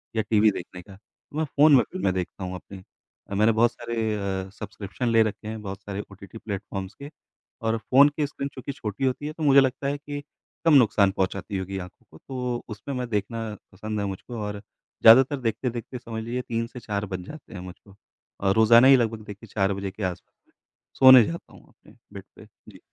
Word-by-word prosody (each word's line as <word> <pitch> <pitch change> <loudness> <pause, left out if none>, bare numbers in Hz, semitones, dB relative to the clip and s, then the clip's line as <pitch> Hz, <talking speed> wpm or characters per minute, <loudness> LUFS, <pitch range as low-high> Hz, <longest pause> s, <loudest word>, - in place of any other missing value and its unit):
या 110 - +2
टीवी 110 -1 +5
देखने 90 -2 -8
का, 95 +2 -14
तो 120 +7 -15
मैं 160 - +1
फ़ोन 145 +1 +5
में 125 - +5
फ़िल्में 180 - -1
देखता 95 +1 -4
हूँ 90 0 -4
अपनी। 95 +1 -11 0.5
अ, 100 - -4
मैंने 110 +3 +4
बहुत 115 +2 +3
सारे 115 -2 -3 0.3
अ, 95 - -12
सब्सक्रिप्शन 105 +3 -4
ले 115 -1 +5
रखे 105 0 -5
हैं, 110 0 -5
बहुत 100 -1 -7
सारे 100 +1 -5
ओटीटी 100 +3 -12
प्लेटफॉर्म्स 100 -2 -6
के, 140 +4 -10 0.5
और 115 0 0
फ़ोन 140 +6 +5
की 145 0 -2
स्क्रीन 140 -1 -5
चूँकि 135 +1 -6
छोटी 120 -1 -4
होती 130 +3 -1
है 155 - -5
तो 160 - -6
मुझे 140 -1 +7
लगता 135 +1 -1
है 145 - -1
कि 145 0 -7 0.4
कम 165 - +5
नुकसान 105 -7 +5
पहुँचाती 95 +1 -2
होगी 95 +1 -4
आँखों 90 -1 -10
को, 80 - -14
तो 125 +2 -4
उसमें 110 +6 -6
मैं 125 -1 -3
देखना 115 +2 -2 0.3
पसंद 105 +2 -5
है 100 - -1
मुझको 100 +5 -6
और 105 0 -4 0.4
ज़्यादातर 130 +5 +7
देखते-देखते 120 +1 -3
समझ 115 -2 -6
लीजिए 120 +2 -3
3 115 -2 -3
से 125 - -10
4 105 -3 -3
बज 95 -2 -5
जाते 155 - -11
हैं 95 - -7
मुझको 95 +2 -12 0.5
और 95 - +3
रोजाना 115 +3 +7
ही 135 - +9
लगभग 115 -2 -1
देखिए 105 +2 -10
4 100 -1 +1
बजे 100 0 -4
के 105 - -8
आस 90 -1 -2 0.8
सोने 130 -2 +10
जाता 170 +7 -7
हूँ - - -14
मैं - - -24
अपने - - -21 0.2
बेड - - -8
पे - - -14 0.3
जी। - - -16
110 Hz, 210 wpm, -25 LUFS, 100-130 Hz, 0.8 s, सोने